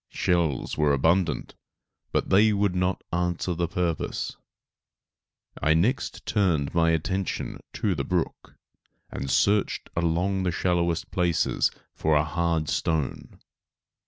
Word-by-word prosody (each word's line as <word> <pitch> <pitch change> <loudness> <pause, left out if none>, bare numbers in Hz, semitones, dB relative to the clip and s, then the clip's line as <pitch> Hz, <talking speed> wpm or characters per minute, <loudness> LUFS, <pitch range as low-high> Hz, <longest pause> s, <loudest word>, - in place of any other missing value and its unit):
Shells 80 -6 0
were 75 -2 +4
abundant, 80 +5 +1 0.6
but - - -1
they 105 +3 +5
would 100 -2 +1
not 90 0 0
answer 90 +1 0
the 85 0 -1
purpose. 85 -1 -2 1.3
I 80 +1 +3
next 115 +11 0
turned 85 -9 +1
my 85 -1 +3
attention 95 +4 -2
to 100 - 0
the 70 -5 -2
brook, 85 +4 -3 0.6
and 70 - -4
searched 100 +9 +1
along 85 +3 +1
the 90 -1 0
shallowest 85 -1 0
places 90 -3 +1 0.2
for 80 0 +1
a 75 - +4
hard 85 -1 0
stone. 80 -4 -2
85 Hz, 120 wpm, -26 LUFS, 80-90 Hz, 1.3 s, they